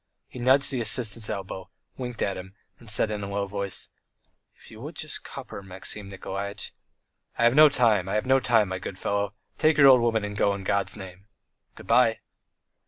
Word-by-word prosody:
He - - -10
nudged 130 +3 +3
the 130 -3 -1
assistant's 110 -1 +1
elbow, 95 -2 -5 0.3
winked 125 -2 -4
at 100 - -1
him, 95 +2 -9 0.2
and 115 - -8
said 110 +1 +2
in 105 -1 -3
a 100 - -5
low 100 0 -1
voice: 100 -1 -4 0.7
"If - - -17
you - - -12
would - - -8
just - - -4
cup - - -9
her, - - -6
Maxim 95 +1 -7
Nikolaitch." 100 +1 -5 0.6
"I - - +1
have 120 0 +5
no 155 +2 +8
time, 110 -9 +2
I 100 - -1
have 105 - 0
no 135 +1 +4
time, 115 -5 +2
my 95 0 -3
good 95 +1 -7
fellow. 100 0 -2 0.2
Take 155 -1 +3
your 140 - +7
old 130 -2 +7
woman 115 -2 +1
and 100 0 -6
go 100 -1 +2
in 100 - -7
God's 100 +1 0
name. 95 +1 -11 0.5
Goodbye." - - +3
105 Hz, 200 wpm, -26 LUFS, 100-120 Hz, 0.7 s, no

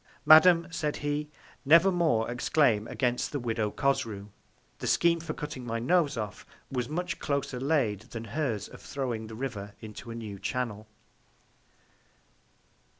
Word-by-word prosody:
Madam, 165 +2 +8
said 150 -2 -2
he, 145 +1 -1 0.3
never 165 +6 +6
more 160 -11 +2
exclaim 120 -2 +2
against 125 -2 -1
the 145 - -2
Widow 115 -3 -1
Cosrou. 105 -5 -1 0.5
The - - -4
Scheme 170 0 +3
for 155 -2 -5
cutting 150 -4 -6
my 115 -1 -3
Nose 150 +3 +2
off 105 -3 -5 0.3
was 125 -3 -2
much 175 +2 -3
closer 140 -3 -2
laid 130 -8 +1
than 115 -1 -6
hers 115 -2 -2
of - - -13
throwing 120 -5 -4
the 110 - -9
River 105 -5 -5
into 110 +2 -9
a 115 - -6
new 105 -4 -7
Channel. 110 -1 -3
125 Hz, 145 wpm, -29 LUFS, 110-150 Hz, 0.5 s, Madam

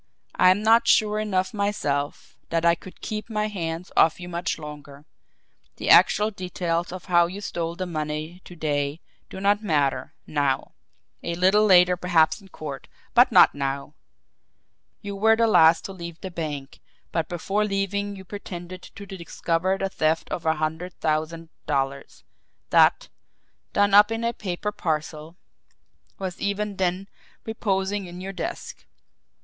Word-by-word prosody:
"I'm 185 +3 +4
not 225 +2 +5
sure 215 0 +4
enough 195 -1 -1
myself 150 -9 -2
that 165 0 0
I 170 - +6
could 180 +2 -10
keep 215 +1 -5
my 215 -1 -1
hands 170 -3 -5
off 160 +2 +4
you 175 - -7
much 175 0 -2
longer. 150 -2 -10 0.7
The - - 0
actual 210 +1 +6
details 175 -3 -3
of 185 0 -8
how 175 -1 +4
you 190 +3 -7
stole 170 -4 -4
the 185 - -3
money 155 +1 -4
to 175 - -11
day 145 -1 -1 0.3
do - - -8
not 205 +2 +2
matter 150 -9 0
NOW. 140 -3 -1 0.5
A 170 - -3
little 190 +4 +4
later 180 -2 +6
perhaps 175 0 +2
in 195 - -16
court 150 -6 -8 0.3
but 245 +1 +6
not - - +7
now. 140 +1 -3 1.1
You 200 -1 -5
were 220 +3 +4
the 230 +1 +3
last 165 -6 +5
to - - -5
leave 170 -2 -8
the 190 - -6
bank, 150 -5 -5 0.3
but 165 -1 -1
before 195 +4 -1
leaving 200 0 -2
you 190 -1 -11
pretended 185 -2 -8
to 200 +2 -11
discover 185 -1 -2
the 195 - -1
theft 160 -3 -1
of 165 -2 -3
a 160 - +3
hundred 160 +4 -4
thousand 160 +1 -2 0.2
dollars 135 0 -2 0.5
that, - - +4 0.6
done 205 0 +2
up 210 +2 +7
in 225 +1 -2
a 235 0 0
paper 200 0 -4
parcel, 155 -2 -3 0.8
was 185 -2 -5
even 200 0 -2
then 185 +1 -1 0.4
reposing 200 -3 -1
in 175 +1 -9
your 195 +1 -6
desk. 180 - -6
180 Hz, 155 wpm, -24 LUFS, 160-200 Hz, 1.1 s, not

